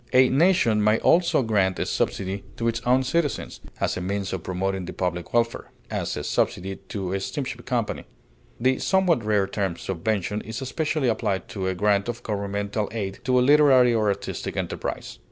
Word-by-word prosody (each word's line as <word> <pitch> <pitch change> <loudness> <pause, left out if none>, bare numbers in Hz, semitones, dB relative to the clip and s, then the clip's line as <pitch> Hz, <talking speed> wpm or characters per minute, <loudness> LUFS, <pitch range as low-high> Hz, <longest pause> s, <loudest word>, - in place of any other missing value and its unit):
A 130 0 +6
nation 135 - +3
may 105 +1 +4
also 170 -2 +3
grant 100 -5 +1
a - - -1
subsidy 95 0 -2
to 115 - -1
its 115 0 0
own 130 +1 +4
citizens 150 +2 -1 0.2
as - - 0
a - - -3
means 95 +1 -2
of 95 - -3
promoting 95 +1 -2
the - - -6
public 90 -2 -3
welfare; 115 0 0 0.2
as, - - -2
a - - -4
subsidy 95 +2 -1
to 95 -4 -3
a 95 - 0
steamship 125 +2 -5
company. 120 -4 -1 0.5
The 130 +2 +2
somewhat 185 - +2
rare 105 -2 +2
term 95 -3 -2
subvention 100 +3 -2
is 110 +2 -6
especially 150 +1 -1
applied 100 -4 -1
to 95 -2 -3
a 95 - -1
grant 100 +2 +2
of 120 0 -5
governmental 100 0 -2
aid 100 -4 -4
to 125 0 +3
a 125 - +3
literary 135 -4 +6
or 110 -2 +2
artistic 100 0 -3
enterprise. - - -4
110 Hz, 180 wpm, -25 LUFS, 95-125 Hz, 0.5 s, A